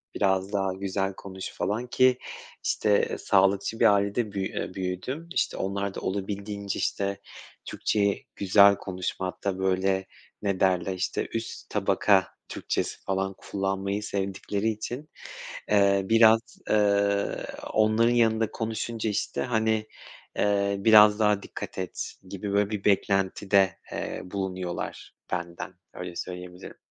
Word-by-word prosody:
biraz 95 +1 +1
daha 95 -2 0
güzel 95 0 -2
konuş 95 0 -8
falan 110 +5 -2
ki, 130 +1 +4 0.5
işte 105 -1 +2
sağlıkçı 100 +3 +2
bir - - +6
ailede 100 +2 0
büyü 95 -1 -2
eee, - - -5
büyüdüm. 95 - -4
İşte, - - 0
onlar 100 +1 -2
da - - -3
olabildiğince, 100 +1 -3
işte, 100 0 -1 0.5
Türkçeyi 100 -1 0
güzel 100 +1 +6
konuşmakta, 95 0 -3
böyle, 95 0 +1 0.4
ne 100 -2 -1
derler, 95 0 +2
işte, 95 0 -2
üst 115 0 -5
tabaka 100 -1 +3 0.2
Türkçesi - - -3
falan 95 0 -1
kullanmayı 100 +1 -2
sevdikleri 100 +1 -2
için, 120 +7 -5 0.6
eee, 100 -1 +4
biraz, 115 0 +7 0.3
ııı, 100 -1 +2 0.3
onların 110 +2 +4
yanında 115 -2 +2
konuşunca, 110 0 -3
işte, 105 - -2
hani, 110 -3 +1 0.5
eee, 100 -1 +2
biraz 105 0 +7
daha 105 -2 +3
dikkat - - -7
et 95 -1 -4 0.2
gibi, 100 +1 -4
böyle, 100 0 +2
bir 105 -2 -4
beklentide, 95 -1 +2
eee, - - -4
bulunuyorlar 95 -2 -4 0.2
benden, 85 0 -4 0.2
öyle 90 -1 -7
söyleyebilirim. 90 0 -7
100 Hz, 120 wpm, -27 LUFS, 95-105 Hz, 0.6 s, biraz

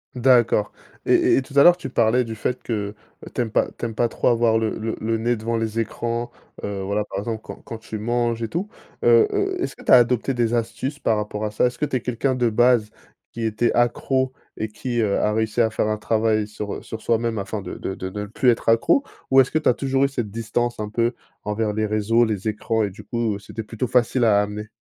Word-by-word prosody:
D'accord. 120 -4 +3 0.4
Et - - +4
et - - +3
tout 135 +2 -8
à 140 - +8
l'heure 175 - +8
tu 180 - -7
parlais 120 0 +3
du 115 -1 -6
fait 125 +4 -3
que 105 -3 -3 0.4
tu 125 - -1
aimes 115 - -1
pas - - +2
tu - - -2
aimes 115 - -4
pas 120 - +2
trop - - -1
avoir 115 -2 +3
le 110 -1 -1
le 110 0 -3
le 115 +1 0
nez 120 +2 0
devant 115 +1 -2
les 115 0 -2
écrans, 120 +1 -3 0.3
heu, 100 -1 -3
voilà, 100 +2 -1
par - - -6
exemple 110 +1 -4
quand - - -8
quand 115 - -7
tu 110 0 -7
manges 120 +1 -1
et - - -1
tout. 180 - -3 0.3
Heu 455 -2 +6
heu, 390 -2 -1
est-ce - - -3
que - - -14
tu - - 0
as - - +11
adopté 125 +1 +3
des 120 -1 +1
astuces 120 +5 -2
par 110 -5 +1
rapport 105 0 -4
à 105 - -1
ça? 105 - +2
Est-ce 125 - -2
que 150 - +1
tu 140 - -3
es 125 - 0
quelqu'un 125 +2 -1
de 120 -2 +2
base 120 -1 +3 0.4
qui 115 - -5
était 110 +2 +1
accro 130 +2 +1 0.2
et 110 - -3
qui, 120 +2 -4
heu, 105 -3 +1
a 105 - +1
réussi 110 +1 -1
à 110 - +2
faire 110 - 0
un 110 0 0
travail 110 -1 +1
sur, 105 -1 -5
heu, - - -7
sur 110 - -7
soi-même 115 -1 0
afin 100 +1 -4
de 90 - -6
de 95 - -4
de 95 - -5
ne 105 +1 -4
plus 125 +4 +2
être 115 - -1
accro? 115 - +4 0.3
Ou 135 0 +8
est-ce 130 - 0
que - - 0
tu - - 0
as - - +6
toujours 135 +1 0
eu - - +5
cette 120 -6 -3
distance 115 +2 -2
un 105 - -3
peu 115 +3 0 0.3
envers 105 0 -1
les 110 0 0
réseaux, 110 +3 +2
les 110 -2 -2
écrans 110 +1 0
et 100 - -2
du 100 - -12
coup, 115 -2 -1
heu, - - -7
c'était 110 +3 -7
plutôt 115 +3 -4
facile 125 0 +2
à 105 -2 +5
amener? 105 +1 -6
115 Hz, 255 wpm, -22 LUFS, 110-120 Hz, 0.4 s, as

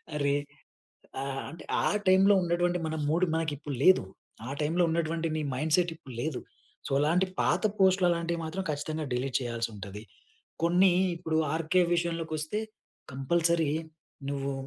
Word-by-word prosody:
అరే! 140 -1 +1 0.9
ఆ! - - -3 0.3
అంటే 165 - -11 0.2
ఆ - - +1 0.2
టైంలో 195 +2 +6
ఉన్నటువంటి 175 +1 +1
మన 160 - -2
మూడ్ 170 +4 +3
మనకి 160 -2 0
ఇప్పుడు 145 -2 -5
లేదు. 185 - +7 0.5
ఆ - - -5
టైంలో 165 +4 +1
ఉన్నటువంటి 165 0 -1
నీ 155 - -1
మైండ్ 155 +4 0
సెట్ 175 -2 +1
ఇప్పుడు 130 -5 -12
లేదు. 155 -4 -2 0.5
సో, - - -6
అలాంటి 170 +6 +3
పాత - - +2 0.2
పోస్ట్‌‌‌లు 190 -2 +4
అలాంటివి 170 0 -1
మాత్రం 185 +4 -4
ఖచ్చితంగా 155 +2 -3
డిలీట్ 125 +1 -1
చేయాల్సి 115 -2 -2
ఉంటది. 100 0 -8 0.6
కొన్ని 180 +2 +5 0.2
ఇప్పుడు 160 -2 -2 0.2
ఆర్‌కె 165 +3 +2
విషయంలోకి 165 -2 -2
వస్తే 155 +8 -2 0.5
కంపల్సరీ 165 +3 +1 0.6
నువ్వు 140 0 -2
160 Hz, 145 wpm, -29 LUFS, 145-175 Hz, 0.9 s, లేదు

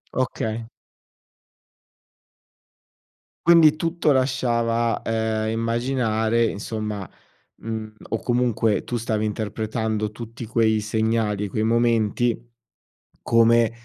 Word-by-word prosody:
Okay. 115 -3 -2 2.8
Quindi 165 -3 +7
tutto 165 -2 +1
lasciava, 120 -3 +1
ehm, 110 -1 -1
immaginare 115 -1 0
insomma 105 -2 -4 0.5
mhmm, 110 -1 -5 0.2
o 115 - -1
comunque 120 -3 +1
tu 120 - -3
stavi 110 -1 -1
interpretando 110 0 -2
tutti 115 +1 -8
quei 110 -1 +2
segnali 110 -1 0
e - - -3
quei 110 - -1
momenti 115 0 +2 0.9
come, 115 0 +4
115 Hz, 85 wpm, -23 LUFS, 110-120 Hz, 2.8 s, Quindi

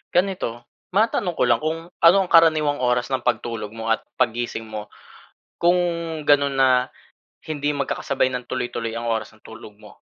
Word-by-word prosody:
Ganito, 185 -5 +1 0.4
matanong 200 -4 +1
ko - - +2
lang, 115 -1 +4
kung 160 +1 -1 0.3
ano 175 +4 +8
ang 185 - -3
karaniwang 155 -3 +5
oras 125 0 +1
ng 130 -1 -2
pagtulog 115 -3 -2
mo 115 - -5
at - - -3 0.2
paggising 120 -2 -1
mo. 105 - -3 0.8
Kung 175 +1 +4 0.5
ganun 140 -1 +4
na 130 - +5 0.8
hindi 145 -1 -2
magkakasabay 140 -1 -1
ng 125 - -4
tuloy-tuloy 120 -2 -3
ang 115 0 -4
oras 110 -1 -5
ng 110 - -24
tulog 110 -1 -12
mo? - - -16
130 Hz, 160 wpm, -22 LUFS, 115-160 Hz, 0.8 s, ano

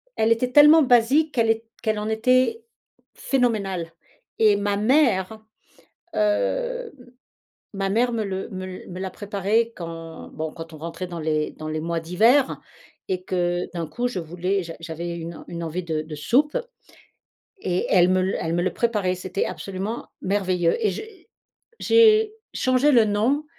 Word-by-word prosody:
elle 220 +1 +2
était 250 +2 +1
tellement 300 +2 +8
basique 260 +6 +3
qu'elle 230 -3 +2
est 225 0 +1 0.2
qu'elle 215 -2 0
en 210 - -3
était 255 - +2 0.5
phénoménale, 200 -10 -1 0.5
et 215 -2 +5
ma 205 0 0
mère, 220 -4 +2 0.7
heu, - - 0
m 245 0 -17 0.6
ma 195 -1 -2
mère 240 +4 +2
me 220 -2 -1
le 190 -1 -4
me 185 -1 -6
l 185 0 -9
me 180 +1 -7
la 190 -1 -4
préparait 210 +3 0
quand, 165 -1 -8
bon, 160 0 -4
quand 165 -1 -9
on - - -9
rentrait 165 +3 -5
dans 170 -1 -7
les 155 -1 -1
dans 155 0 -8
les 155 0 -2
mois 170 0 -2
d'hiver 225 - +3 0.5
et 185 -1 -2
que 175 -1 -1
d'un 170 -2 -3
coup, 245 +1 -2
je 245 - -5
voulais 180 +4 -2
j'a 165 0 -8
j'avais 170 +1 -5
une 165 0 -8
une 170 -1 -6
envie 170 +3 -4
de 155 -2 -4
soupe 270 - +2 1.0
et 180 0 -1
elle 180 -1 +5
me 185 0 +3
le 190 - -1
elle 160 - -2
me 175 - +1
le 185 - -1
préparait, 210 -6 0
c'était 185 +2 -3
absolument 195 +4 -5 0.2
merveilleux, 185 -3 +1
et - - +4
j'ai 435 -3 -10 0.5
j'ai 440 -1 +5 0.2
changé 255 +3 +3
le 230 -4 +5
nom 235 +9 +1
200 Hz, 165 wpm, -23 LUFS, 175-245 Hz, 1.0 s, tellement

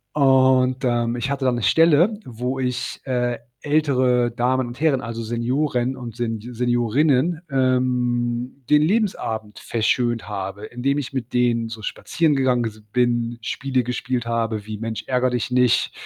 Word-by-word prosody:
Und, 130 -2 +4
ähm, 120 -1 0
ich 125 +3 -2
hatte 140 -1 -2
da 130 - +3
'ne 120 -1 -2
Stelle, 165 - +4
wo 125 +2 -4
ich, 125 -1 -3
äh, 125 -2 -1 0.2
ältere 130 -5 +2
Damen 125 +2 +1
und 120 +1 -9
Herren, 150 -4 +2
also, 115 0 -5
Senioren 125 +3 -1
und 120 -3 -8
Sen 115 -2 -2
Seniorinnen, 125 +7 +1
ähm, 125 -1 0
den 150 0 +5
Lebensabend 155 - -1
verschönt 120 +1 0
habe, 100 +1 -5
indem 135 +4 -1
ich 135 - -5
mit 130 -3 -5
denen 120 -2 +2
so 110 -1 -8
spazieren 160 +8 0
gegangen 130 -3 +2
s 110 -1 -5
bin, 120 -1 +1
Spiele 130 +4 -1
gespielt 125 0 -2
habe 115 -2 -2
wie 110 0 -6
„Mensch 110 0 -4
ärgere 125 -1 +1
Dich 125 0 -2
nicht.“ 125 -1 +3
125 Hz, 155 wpm, -22 LUFS, 115-130 Hz, 0.2 s, den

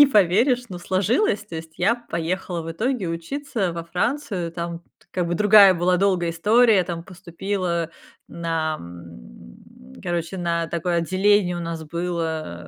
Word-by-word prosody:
не 290 - +10
поверишь, 235 +3 +3
но 180 - -7
сложилось. 200 - +1
То - - -11
есть, 160 0 -9
я 205 +6 +3
поехала, 180 -6 -3
в 165 - -6
итоге, 220 +1 -1
учиться 195 - -3
во 170 0 -5
Францию, 180 - -2
там 170 0 -5 0.2
т - - -28
как 180 -2 -1
бы 170 - -1
другая 205 0 +7
была 180 +1 +2
долгая 180 -3 +1
история, 210 +4 +4
там 170 -2 -5
поступила, 180 -2 -3 0.4
на, 165 -2 -2
м, 65 -7 -14
короче, 175 +1 -3
на 170 -1 -1
такое 170 +1 -1
отделение 185 +1 +2
у - - -4
нас 165 -1 -5
было, 160 - -3
175 Hz, 150 wpm, -23 LUFS, 165-200 Hz, 0.4 s, не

